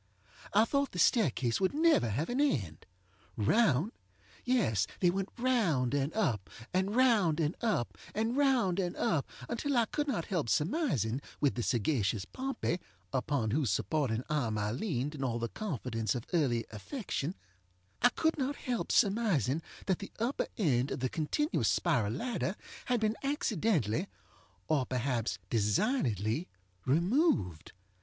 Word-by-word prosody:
I 215 +2 +5
thought 280 +2 0
the - - -6
staircase 140 - +2
would 190 +7 +1
never 315 - +4
have 130 +10 -1
an 250 +3 0
end. 100 - -1 0.5
Round! 160 - +3 0.5
Yes, 145 - +2
they 175 -2 +4
went 195 +1 -2
round 205 - +2
and 140 +1 +1
up, 120 - 0 0.2
and 190 +3 +1
round 215 -11 +4
and 160 +1 0
up 215 - 0 0.2
and 225 +3 0
round 255 -10 +3
and 180 -2 -1
up, 155 -5 0 0.2
until 275 +3 -1
I 235 - +4
could 295 +5 -2
not 210 - -1
help 170 - -1
surmising, 150 - +1 0.2
with 145 -2 +2
the 120 - -3
sagacious 110 -4 0
Pompey, 260 -9 -2 0.3
upon 130 -4 0
whose 135 -1 +1
supporting 125 - 0
arm 120 -8 0
I 105 0 -1
leaned 140 - -2
in 140 -3 -5
all 120 -3 0
the 115 0 -2
confidence 125 - -2
of 120 - -3
early 125 -9 +2
affectionŌĆöI 175 - -4 0.8
could 320 -1 +1
not 275 +2 0
help 245 -4 -3
surmising 195 - +2 0.2
that 190 -3 +1
the 200 - -8
upper 235 +5 -1
end 135 - +2
of - - -4
the 130 - 0
continuous 295 - 0
spiral 105 -4 +1
ladder 215 - -2 0.3
had 245 -2 +1
been 215 +1 0
accidentally, 215 - 0 0.6
or 140 -5 +1
perhaps 120 -6 -1
designedly, 115 - +1 0.4
removed. 170 - +1
160 Hz, 145 wpm, -32 LUFS, -, 0.8 s, I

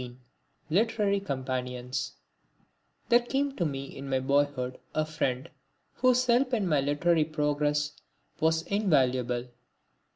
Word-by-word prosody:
(19) 125 0 -9 0.5
Literary 205 +1 +2
Companions 130 -5 -3 1.0
There 240 0 +7
came 270 +3 -1
to - - -1
me 140 -2 -3
in 135 0 -7
my 130 -1 +2
boyhood 140 -1 0 0.2
a 155 - +2
friend 135 -5 -2 0.5
whose 255 0 +3
help 250 +1 +3
in 210 -4 0
my 150 -4 +3
literary 155 +4 +2
progress 150 -1 0 0.5
was 160 0 +2
invaluable. 130 - +1
150 Hz, 120 wpm, -29 LUFS, 130-200 Hz, 1.0 s, There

